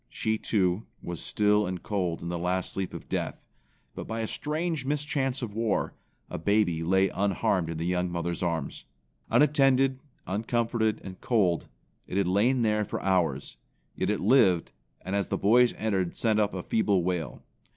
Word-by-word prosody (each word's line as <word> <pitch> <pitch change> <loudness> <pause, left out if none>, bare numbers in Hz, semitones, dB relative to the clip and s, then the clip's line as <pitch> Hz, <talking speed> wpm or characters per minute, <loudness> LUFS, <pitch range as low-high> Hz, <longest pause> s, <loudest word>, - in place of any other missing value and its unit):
She, 110 0 -1
too, 95 0 0 0.2
was 85 -1 -5
still 105 -1 +2
and 90 -1 -5
cold 90 -6 -2
in 85 - -4
the 85 -1 -3
last 90 +1 -1
sleep 95 -2 -3
of - - -9
death, - - -3 0.5
but - - -7
by 115 0 -3
a 110 - -2
strange 155 +2 -2
mischance 140 -2 -1
of 110 -4 -4
war, 110 -1 0 0.3
a - - -5
baby 100 -2 +2
lay 95 +3 +3
unharmed 100 -2 0
in 80 - -4
the 80 - -3
young 90 0 0
mother's 85 -1 -3
arms. 85 -2 -2 0.4
Unattended, 135 -3 +4 0.3
uncomforted 110 +1 0
and 95 -1 -9
cold, 95 -8 +1 0.4
it 95 - -3
had 100 -2 +2
lain 115 +7 +2
there 105 -1 +2
for - - -4
hours; 80 -9 0 0.4
yet - - -1
it - - 0
lived, 100 -6 +4 0.3
and 95 +2 -3
as 100 -1 0
the - - -1
boys 120 +4 +5
entered 95 -5 -1
sent 110 -2 +2
up 105 -2 +1
a 90 - -4
feeble 100 -5 +1
wail. 90 -2 -3
100 Hz, 170 wpm, -28 LUFS, 90-115 Hz, 0.5 s, boys